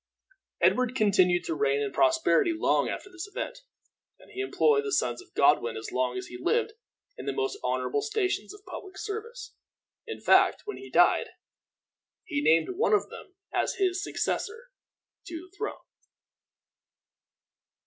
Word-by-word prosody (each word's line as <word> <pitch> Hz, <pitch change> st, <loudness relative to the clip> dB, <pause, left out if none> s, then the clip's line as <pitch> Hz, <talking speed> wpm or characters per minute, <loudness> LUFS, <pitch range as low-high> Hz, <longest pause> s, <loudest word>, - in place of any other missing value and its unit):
Edward 250 Hz, 0 st, +3 dB
continued 185 Hz, -6 st, +3 dB
to -, -, -2 dB
reign 140 Hz, -2 st, +1 dB
in 140 Hz, -1 st, -2 dB
prosperity 335 Hz, +3 st, +3 dB
long -, -, +2 dB
after -, -, -5 dB
this 360 Hz, +1 st, -7 dB
event, 465 Hz, +4 st, -5 dB, 0.6 s
and -, -, -19 dB
he 390 Hz, -, -4 dB
employed 430 Hz, +2 st, +2 dB
the 420 Hz, -, -3 dB
sons 120 Hz, -, 0 dB
of -, -, -19 dB
Godwin 140 Hz, -5 st, +3 dB
as 110 Hz, -, -6 dB
long 125 Hz, 0 st, 0 dB
as 125 Hz, -, -4 dB
he 125 Hz, -, -9 dB
lived 465 Hz, -1 st, +1 dB, 0.5 s
in -, -, -7 dB
the -, -, +1 dB
most 405 Hz, -1 st, -2 dB
honorable 425 Hz, -, 0 dB
stations 425 Hz, -3 st, -1 dB
of 410 Hz, 0 st, -14 dB
public 385 Hz, -1 st, -9 dB
service. 445 Hz, +4 st, -6 dB, 0.5 s
In 450 Hz, -, -6 dB
fact, -, -, +4 dB
when 415 Hz, -, -5 dB
he 395 Hz, -, -10 dB
died, -, -, +4 dB, 1.0 s
he 290 Hz, -5 st, -2 dB
named 165 Hz, -, +4 dB
one 435 Hz, -, +2 dB
of 415 Hz, -, +2 dB
them 380 Hz, -, -11 dB, 0.2 s
as -, -, 0 dB
his 380 Hz, 0 st, 0 dB
successor 460 Hz, +3 st, -3 dB, 0.6 s
to 335 Hz, -, -6 dB
the 370 Hz, +3 st, -15 dB
throne. 430 Hz, +1 st, -5 dB
370 Hz, 155 wpm, -28 LUFS, -, 1.0 s, fact